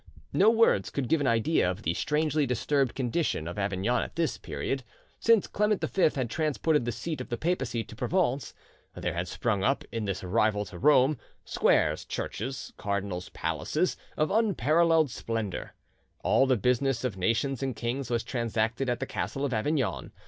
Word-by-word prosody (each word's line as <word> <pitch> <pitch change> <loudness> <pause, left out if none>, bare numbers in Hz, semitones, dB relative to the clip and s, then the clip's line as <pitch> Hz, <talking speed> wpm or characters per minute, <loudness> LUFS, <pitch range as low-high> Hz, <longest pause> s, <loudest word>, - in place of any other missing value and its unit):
No 205 - +5
words 225 - +3
could 140 -3 -2
give 160 +2 +2
an 140 - +1
idea 115 - +2
of 95 +4 -5
the 85 - +1
strangely 150 - +1
disturbed 130 +2 0
condition 130 - -1
of 85 +4 -5
Avignon 100 +5 0
at - - -6
this 165 -2 0
period. 135 -1 -4 0.4
Since 230 -3 +4
Clement 210 0 +1
V 190 -5 +3
had 130 -3 -1
transported 155 0 +1
the 120 - -1
seat 160 +6 -4
of - - -8
the 120 - -2
papacy 155 -7 -1
to 110 - -12
Provence, 145 - 0 0.4
there 90 - -2
had 85 +1 -2
sprung 100 +1 -1
up, 135 +4 +1
in 115 -2 -3
this 95 -2 -3
rival 105 +2 +1
to 90 -4 -10
Rome, 140 -1 +4 0.3
squares, - - +2
churches, 130 +5 -5
cardinals' 100 -3 -3
palaces, 80 - -1 0.2
of 155 - +1
unparalleled 165 - +3
splendour. 115 -5 -4 0.5
All 135 - +4
the 130 -2 +3
business 125 +3 +1
of 125 -6 -1
nations 115 +8 0
and 135 -3 -2
kings 120 +3 -3
was 120 -1 0
transacted 115 +1 -1
at 120 -1 -1
the - - 0
castle 140 +1 -3
of 135 - -2
Avignon. 110 - -1
125 Hz, 170 wpm, -28 LUFS, 110-150 Hz, 0.5 s, No